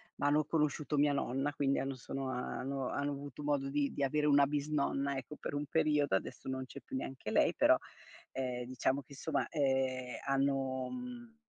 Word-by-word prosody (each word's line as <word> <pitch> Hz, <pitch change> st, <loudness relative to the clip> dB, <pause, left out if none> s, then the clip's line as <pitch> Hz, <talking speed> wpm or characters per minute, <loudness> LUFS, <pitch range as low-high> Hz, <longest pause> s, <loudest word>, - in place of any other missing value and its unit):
ma 145 Hz, -, 0 dB
hanno 150 Hz, +1 st, +4 dB
conosciuto 150 Hz, -1 st, 0 dB
mia 145 Hz, 0 st, +4 dB
nonna, 140 Hz, +1 st, 0 dB
quindi 140 Hz, -1 st, +1 dB
hanno 135 Hz, 0 st, -1 dB
sono 135 Hz, +2 st, -4 dB
hanno 130 Hz, +1 st, -2 dB
hanno 145 Hz, 0 st, -1 dB
avuto 140 Hz, 0 st, -6 dB
modo 145 Hz, -2 st, +1 dB
di 140 Hz, 0 st, +1 dB
di 140 Hz, -, -1 dB
avere 150 Hz, +2 st, +2 dB
una 140 Hz, -1 st, +6 dB
bisnonna, 140 Hz, -1 st, 0 dB
ecco, 135 Hz, +3 st, -6 dB
per -, -, -5 dB
un 145 Hz, +1 st, -1 dB
periodo. 150 Hz, -4 st, +3 dB
Adesso 95 Hz, -, -3 dB
non 130 Hz, 0 st, -2 dB
c'è 140 Hz, +1 st, -10 dB
più -, -, -5 dB
neanche 135 Hz, 0 st, -5 dB
lei, -, -, +4 dB
però -, -, +6 dB, 0.5 s
ehm, 125 Hz, -2 st, -2 dB
diciamo 130 Hz, +2 st, 0 dB
che, 135 Hz, -, -14 dB
somma, 160 Hz, +4 st, -1 dB
ehm, 130 Hz, -4 st, 0 dB
hanno 135 Hz, -1 st, +1 dB
mhmm, 245 Hz, -2 st, -7 dB
140 Hz, 185 wpm, -34 LUFS, 130-145 Hz, 0.5 s, una